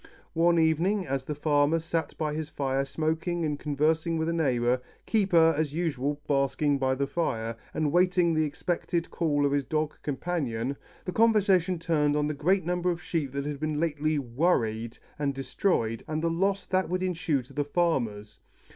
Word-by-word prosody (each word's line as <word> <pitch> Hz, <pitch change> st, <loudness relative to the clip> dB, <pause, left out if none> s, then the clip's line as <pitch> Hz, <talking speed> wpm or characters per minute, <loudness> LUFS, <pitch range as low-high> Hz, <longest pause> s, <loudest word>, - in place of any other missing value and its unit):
One 170 Hz, +1 st, +3 dB
evening 170 Hz, +5 st, +2 dB
as 135 Hz, -2 st, -2 dB
the 150 Hz, -, -3 dB
farmer 145 Hz, +1 st, +2 dB
sat 165 Hz, 0 st, -3 dB
by 155 Hz, -2 st, -1 dB
his 155 Hz, 0 st, -4 dB
fire 135 Hz, -2 st, -1 dB
smoking 160 Hz, +4 st, -1 dB
and 150 Hz, -2 st, -2 dB
conversing 160 Hz, +3 st, +1 dB
with 160 Hz, +1 st, 0 dB
a -, -, 0 dB
neighbor, 125 Hz, -6 st, +1 dB, 0.2 s
Keeper 175 Hz, -7 st, +4 dB
as 150 Hz, -1 st, -1 dB
usual 145 Hz, -4 st, -1 dB
basking 140 Hz, +1 st, +1 dB
by 130 Hz, 0 st, +1 dB
the 140 Hz, +1 st, 0 dB
fire, 115 Hz, -8 st, -2 dB, 0.2 s
and 155 Hz, -2 st, 0 dB
waiting 180 Hz, 0 st, +3 dB
the 155 Hz, 0 st, +2 dB
expected 170 Hz, +2 st, -2 dB
call 145 Hz, -4 st, +1 dB
of 140 Hz, -, +1 dB
his 140 Hz, 0 st, +1 dB
dog 155 Hz, +1 st, -1 dB
companion, 140 Hz, -5 st, -2 dB, 0.3 s
the 180 Hz, -, -2 dB
conversation 195 Hz, -5 st, +3 dB
turned 155 Hz, -3 st, +1 dB
on 150 Hz, 0 st, +1 dB
the 150 Hz, -, -1 dB
great 170 Hz, +5 st, +1 dB
number 180 Hz, +1 st, 0 dB
of 175 Hz, -1 st, -1 dB
sheep 150 Hz, -6 st, -2 dB
that 140 Hz, 0 st, -3 dB
had 145 Hz, -1 st, -4 dB
been 155 Hz, -1 st, -1 dB
lately 155 Hz, -1 st, 0 dB
"worried" 120 Hz, -4 st, 0 dB, 0.2 s
and 140 Hz, -2 st, -1 dB
destroyed, 130 Hz, -, -1 dB
and 155 Hz, +1 st, -2 dB
the 165 Hz, -, +1 dB
loss 195 Hz, +3 st, 0 dB
that 185 Hz, 0 st, 0 dB
would 185 Hz, +1 st, -1 dB
ensue 165 Hz, -7 st, 0 dB
to 125 Hz, -, -17 dB
the 145 Hz, -, 0 dB
farmers. 120 Hz, -10 st, -1 dB
155 Hz, 180 wpm, -28 LUFS, 140-170 Hz, 0.3 s, Keeper